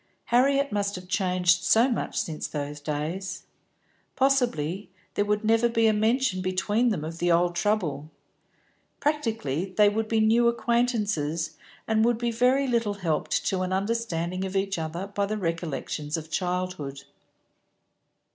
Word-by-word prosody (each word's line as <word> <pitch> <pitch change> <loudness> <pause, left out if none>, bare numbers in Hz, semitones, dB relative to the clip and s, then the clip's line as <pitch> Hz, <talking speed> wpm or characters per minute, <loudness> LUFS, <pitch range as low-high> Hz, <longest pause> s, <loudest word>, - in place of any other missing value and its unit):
Harriet 275 +3 +3
must 205 -1 -1
have 180 0 -8
changed 185 -1 +2
so 230 +3 +5
much 245 - -2
since 155 -2 -3
those 145 0 -5
days. 160 +6 -4 0.7
Possibly 240 - +1 0.2
there 205 - +1
would 210 +1 0
never 225 +2 +3
be 230 -1 +2
a 220 - +5
mention 220 -1 +1
between 205 +6 +1
them 170 -9 -2
of 165 +1 -7
the 175 0 +2
old 175 +1 +3
trouble; 170 -8 -1 0.9
practically 220 - -1
they 210 -1 +6
would 220 +1 -1
be 225 0 +1
new 225 +2 +4
acquaintances, 210 - 0 0.3
and 220 0 +2
would 235 0 +3
be 235 0 -1
very 250 +4 +3
little 230 -4 0
helped 165 -6 -1
to 190 -1 0
an 185 0 -2
understanding 190 -3 -1
of 190 0 -4
each 195 -2 0
other 165 +4 -4
by 200 0 -2
the 215 +1 -2
recollections 165 -3 -3
of 160 0 -8
childhood. 180 -6 -3
195 Hz, 145 wpm, -26 LUFS, 170-225 Hz, 0.9 s, they